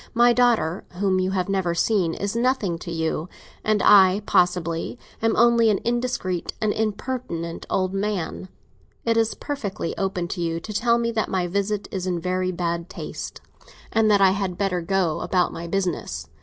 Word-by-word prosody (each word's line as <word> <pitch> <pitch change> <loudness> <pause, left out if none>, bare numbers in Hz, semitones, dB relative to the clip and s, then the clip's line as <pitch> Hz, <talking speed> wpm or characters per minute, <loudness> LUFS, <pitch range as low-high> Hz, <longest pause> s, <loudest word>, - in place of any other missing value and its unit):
My 240 +1 +6
daughter, 230 -9 +2
whom 185 0 +1
you 185 0 +1
have 185 -2 -1
never 190 -3 0
seen, 175 -3 +1
is 200 +2 -3
nothing 235 -8 +1
to 170 - -7
you; 160 0 -2 0.3
and 215 -1 +1
I, 195 0 +6
possibly, 175 +2 +1 0.2
am 225 0 +2
only 235 -1 +5
an 205 - +3
indiscreet 235 -7 -1
and 215 -1 +1
impertinent 215 -6 -3
old 185 0 0
man. 195 -2 -3 0.6
It 230 -1 +2
is 225 -1 +2
perfectly 210 - -4
open 190 -3 -1
to 175 - -3
you 165 -1 -1
to 215 +5 -7
tell 235 +2 +3
me 235 0 0
that 220 -1 -1
my 185 -2 0
visit 200 +3 -1
is 185 -1 -3
in 175 -2 -1
very 185 +1 -1
bad 170 0 -2
taste - - -7 0.5
and 220 -1 +3
that 205 -1 +4
I 190 -1 +6
had 190 -2 -2
better 185 -3 0
go 170 -2 0
about 180 -2 +1
my 170 +1 -6
business. 170 - -2
190 Hz, 175 wpm, -24 LUFS, 175-215 Hz, 0.6 s, My